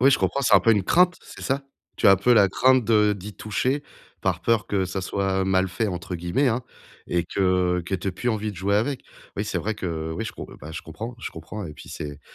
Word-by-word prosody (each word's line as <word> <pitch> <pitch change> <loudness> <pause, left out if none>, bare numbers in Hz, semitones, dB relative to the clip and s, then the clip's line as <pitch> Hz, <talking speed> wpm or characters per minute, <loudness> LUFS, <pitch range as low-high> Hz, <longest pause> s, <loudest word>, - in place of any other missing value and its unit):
Oui, 135 +2 +6
je - - +4
comprends, 140 - 0
c'est 110 - +5
un 95 - +8
peu 115 +4 +5
une 100 -3 +2
crainte, 180 - +4
c'est - - -12
ça? 135 +1 -1 0.3
Tu - - +2
as - - +9
un - - +5
peu 120 +6 +3
la 100 -4 +6
crainte 130 +4 +4
de 105 -1 +4
d'y 100 +1 -7
toucher 130 +6 -1 0.4
par - - 0
peur 115 -4 +1
que 95 -2 +1
ça 95 +2 -3
soit 95 0 0
«mal 95 0 +2
fait» 105 +4 -1
entre 90 0 -5
guillemets 90 +12 0
hein 120 +2 0 0.5
et 85 0 +1
que 90 -1 +1
que 90 - -8
tu 90 - -7
aies 95 - 0
plus 120 +7 -3
envie 110 -2 -1
de - - -13
jouer 100 +3 +1
avec. 130 +5 -1 0.3
Oui - - -1
c'est - - -2
vrai 110 +1 -2
que 80 -4 -4
oui 110 +7 -3
je - - -4
comp - - -8
bah 75 +3 -8
je 80 - -5
comprends, 115 +9 -7
je - - -5
comprends 105 -4 -7
et 75 - -8
puis - - -13
c'est, 75 0 -7
100 Hz, 260 wpm, -24 LUFS, 90-115 Hz, 0.5 s, as